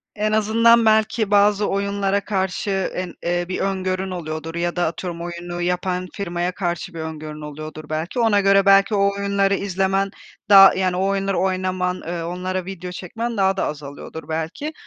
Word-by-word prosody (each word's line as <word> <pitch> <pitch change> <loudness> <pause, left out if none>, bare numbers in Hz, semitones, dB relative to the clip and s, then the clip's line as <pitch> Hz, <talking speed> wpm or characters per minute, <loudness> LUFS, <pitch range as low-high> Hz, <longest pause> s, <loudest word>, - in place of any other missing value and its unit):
En 215 0 0
azından 225 +2 +4
belki 220 -1 +2
bazı 205 0 +4
oyunlara 200 0 0
karşı, 190 0 -2 0.2
en 180 -1 -4
eee, 175 0 0
bir 185 - -2
öngörün 190 -1 -2
oluyordur 160 -1 -5
ya 175 0 -1
da 175 -1 +1
atıyorum 170 +1 -4
oyunu 175 0 -6
yapan 180 +1 -1
firmaya 175 -2 -2
karşı 180 0 -3
bir 165 - -7
öngörün 155 -1 -6
oluyordur 155 +1 -8
belki, 160 +9 -3
ona 225 -3 +4
göre 195 0 +4
belki 195 +2 +5
o 200 0 +3
oyunları 200 0 +1
izlemen 195 0 0 0.4
daha, 195 -1 +9
yani, 185 -1 0
o 190 - 0
oyunları 195 -1 0
oynaman, 185 -1 0
ııı, 170 0 -4
onlara 185 +1 -3
video 180 -1 -7
çekmen 225 +6 -5
daha 195 0 +2
da - - 0
azalıyordur 145 +2 -7
belki. 165 - -3
185 Hz, 165 wpm, -21 LUFS, 175-200 Hz, 0.4 s, daha